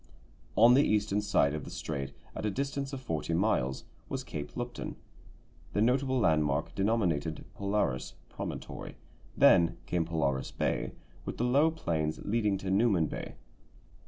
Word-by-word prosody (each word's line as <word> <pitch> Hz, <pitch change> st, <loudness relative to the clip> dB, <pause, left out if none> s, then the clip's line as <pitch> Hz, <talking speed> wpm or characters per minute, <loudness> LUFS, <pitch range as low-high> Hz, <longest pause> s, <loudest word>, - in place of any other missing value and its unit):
On 115 Hz, +3 st, +7 dB
the 135 Hz, -, +6 dB
eastern 105 Hz, -1 st, +1 dB
side 75 Hz, -9 st, +2 dB
of 75 Hz, -2 st, -4 dB
the -, -, -8 dB
strait, 70 Hz, -1 st, -4 dB, 0.2 s
at -, -, -4 dB
a 105 Hz, -, +1 dB
distance 140 Hz, +4 st, -2 dB
of 135 Hz, -, -4 dB
forty 85 Hz, -8 st, -2 dB
miles, 75 Hz, -9 st, +1 dB, 0.3 s
was -, -, -3 dB
Cape 75 Hz, -1 st, -6 dB
Lupton, 120 Hz, 0 st, -4 dB, 0.8 s
the 105 Hz, -, +1 dB
notable 130 Hz, +2 st, +2 dB
landmark 75 Hz, -, +2 dB
denominated 90 Hz, -7 st, 0 dB
Polaris 100 Hz, -11 st, -1 dB
Promontory; -, -, -6 dB, 0.4 s
then 85 Hz, -2 st, +6 dB
came 85 Hz, -2 st, 0 dB
Polaris 70 Hz, -5 st, 0 dB
Bay -, -, -1 dB, 0.3 s
with -, -, -5 dB
the -, -, 0 dB
low 140 Hz, +6 st, +4 dB
plains 80 Hz, -, -2 dB
leading 105 Hz, -2 st, +1 dB
to 95 Hz, 0 st, -3 dB
Newman 100 Hz, -5 st, +3 dB
Bay. -, -, -6 dB
100 Hz, 145 wpm, -31 LUFS, 80-120 Hz, 0.8 s, On